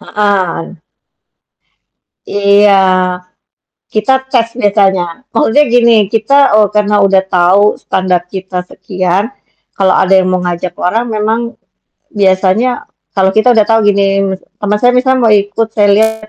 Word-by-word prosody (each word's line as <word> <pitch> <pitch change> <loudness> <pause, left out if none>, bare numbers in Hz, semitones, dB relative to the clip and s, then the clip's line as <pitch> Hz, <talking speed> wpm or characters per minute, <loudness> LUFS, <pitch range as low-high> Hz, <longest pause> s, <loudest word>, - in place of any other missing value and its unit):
Heeh. 190 -4 -2 1.5
Iya, 200 0 +2 1.2
kita 215 +4 0 0.2
tes 235 -3 +1 0.2
misalnya, 195 -3 +2 0.3
maksudnya 230 +5 +2
gini 235 -1 +4 0.2
kita 225 +4 -1 0.2
oh, 210 -1 +3
karena 210 0 0
udah 195 -1 +2
tau 180 +2 +2 0.2
standar 185 -2 -1
kita 190 -1 -6
sekian, 185 0 -2 0.5
kalau 190 -1 +2
ada 190 0 +1
yang 185 -1 +1
mau 185 0 -1
ngajak 175 0 -4
orang 225 +7 -1
memang 215 +2 -1 0.8
biasanya 190 +4 +1 0.5
kalau 190 -1 +2
kita 220 +3 +3
udah 215 - +4
tahu 225 0 +3
gini 200 0 0 0.3
mis 190 0 -5 0.2
teman 210 0 -1
saya 245 +2 +3
misal 260 +1 +1
mau 225 -2 +3
ikut, 205 +2 0
saya 205 -1 +2
lihat 220 0 -1
205 Hz, 135 wpm, -11 LUFS, 190-220 Hz, 1.5 s, gini